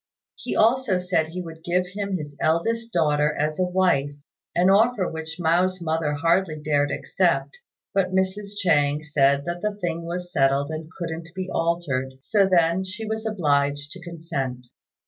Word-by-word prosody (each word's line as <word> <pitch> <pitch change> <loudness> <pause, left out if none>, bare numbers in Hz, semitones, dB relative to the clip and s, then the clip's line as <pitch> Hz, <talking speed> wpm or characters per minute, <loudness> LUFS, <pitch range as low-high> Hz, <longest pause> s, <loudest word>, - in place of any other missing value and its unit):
He - - -5
also 230 -3 +3
said 180 -3 0
he 180 +3 -5
would 160 -1 -10
give 180 +1 +1
him 200 0 -3
his 145 -3 -8
eldest 230 +9 0
daughter 150 -4 +2
as 155 +2 -1
a 185 - +3
wife, 180 -6 +2 0.5
an 180 +2 +4
offer 210 -1 +3
which 160 0 -6
Mao's 180 +3 +2
mother 160 -2 -1
hardly 165 +1 +1
dared 145 -1 +1
accept; - - 0 0.3
but 195 -2 +1
Mrs. 195 +2 -1
Chang 150 -5 +2
said 140 -2 +2
that 175 0 -4
the 210 -1 -1
thing 170 -4 -3
was 175 +1 -5
settled 140 +1 +2
and 155 0 -6
couldn't 165 -1 -5
be 185 0 -4
altered, 160 -6 -1
so 195 +7 +2
then 170 +1 +3
she 200 +4 -6
was 220 +1 -3
obliged 145 -7 0
to 185 - -9
consent. 155 -7 -5
170 Hz, 165 wpm, -24 LUFS, 150-185 Hz, 0.5 s, an